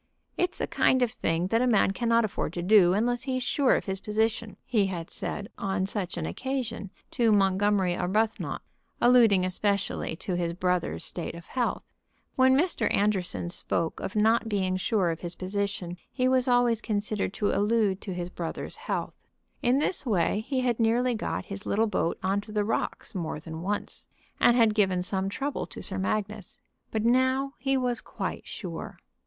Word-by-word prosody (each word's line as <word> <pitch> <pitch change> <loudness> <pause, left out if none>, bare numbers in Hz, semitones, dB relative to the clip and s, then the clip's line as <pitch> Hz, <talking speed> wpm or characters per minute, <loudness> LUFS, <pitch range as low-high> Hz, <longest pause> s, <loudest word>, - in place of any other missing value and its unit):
"It 360 0 0
is - - -5
a - - 0
kind 260 -1 +3
of 240 - 0
thing 165 -2 -1
that 225 +2 +2
a 255 - +2
man 215 -5 +4
cannot 230 +1 +2
afford 195 -5 -3
to 175 - -3
do 185 -2 +6
unless 240 +3 +1
he's 255 -1 -2
sure 270 +1 +3
of - - -2
his 190 -1 -3
position," 220 +1 -1
he 215 -6 +2
had 170 -3 -5
said 205 - -4
on 190 -1 -1
such 190 -3 -3
an 165 - -2
occasion 245 -5 -3 0.2
to 235 -3 +2
Montgomery 195 -2 +3
Arbuthnot, 210 +6 -1 0.4
alluding 230 -7 +5
especially 200 -2 -1
to 185 +3 -4
his 170 -1 -1
brother's 180 -2 -1
state 170 0 -5
of 170 0 -10
health. 250 -2 -2 0.5
When 260 0 +5
Mr. 345 +5 +1
Anderson 190 -4 0
spoke 165 -2 -1
of 190 - -5
not 225 +2 +3
being 190 -3 0
sure 185 -1 +1
of 165 - -5
his 175 -1 -5
position 185 -2 -3
he 255 -1 +1
was 255 -1 +3
always 245 -2 +3
considered 210 -2 -1
to 205 - +1
allude 205 -1 +1
to 190 - -4
his 175 0 -4
brother's 170 -2 -5
health. - - -3 0.5
In 245 +2 +3
this 300 +5 +1
way 205 - +1
he 265 -2 0
had 245 -2 0
nearly 240 +2 +2
got 220 - -3
his 200 0 -7
little 220 +3 +2
boat 190 -6 -1
on 195 +2 +1
to 210 +1 -11
the 210 -1 0
rocks 225 - -2
more 165 -5 -3
than 160 +1 -7
once, 205 +3 -4 0.3
and 240 - +5
had 225 -3 +5
given 190 -4 +2
some 190 +1 0
trouble 275 +7 -3
to - - -8
Sir 190 -1 +1
Magnus. 210 0 -3 0.3
But 220 0 -1
now 260 +3 +2
he 270 -1 +1
was 250 -2 -1
quite - - -5
sure. - - -6
210 Hz, 180 wpm, -27 LUFS, 185-235 Hz, 0.5 s, do